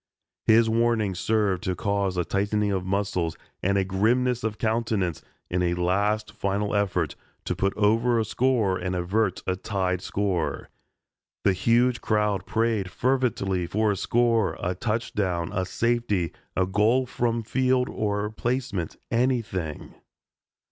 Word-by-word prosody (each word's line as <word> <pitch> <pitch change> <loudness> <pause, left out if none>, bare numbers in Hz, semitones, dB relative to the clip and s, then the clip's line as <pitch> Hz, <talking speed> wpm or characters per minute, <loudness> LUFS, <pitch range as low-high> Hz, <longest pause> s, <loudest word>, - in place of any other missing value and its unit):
His 115 +1 +6
warning 115 -3 +2
served 100 -1 +1
to 90 - 0
cause 100 -1 -1
a 90 - +1
tightening 105 +1 0
of 95 -2 -1
muscles 95 -4 -1 0.2
and 100 +2 +1
a 95 - +2
grimness 120 +6 +1
of 110 -1 -2
countenance 110 -7 0 0.3
in 90 +1 -1
a 85 -1 +1
last 100 +5 0
final 100 +1 -1
effort 90 -6 0 0.3
to - - -1
put 95 0 -1
over 115 +3 +3
a 110 - +1
score 110 -4 +1
and 90 +1 -2
avert 95 +5 0
a 95 - 0
tied 95 -2 -1
score. 95 -6 -2 0.7
The 100 - +4
huge 120 +6 +2
crowd 105 -2 0
prayed 110 -4 0
fervently 100 -7 0
for 105 +3 +1
a - - 0
score 115 -1 +1
a 90 - -1
touchdown 95 -5 -2
a 95 -3 -1
safety 110 -6 0 0.2
a 95 - +3
goal 110 +7 +2
from 115 -1 -1
field 130 +2 +1
or 105 0 -2
placement 115 -7 -2
anything. 115 - -1
105 Hz, 140 wpm, -26 LUFS, 95-115 Hz, 0.7 s, His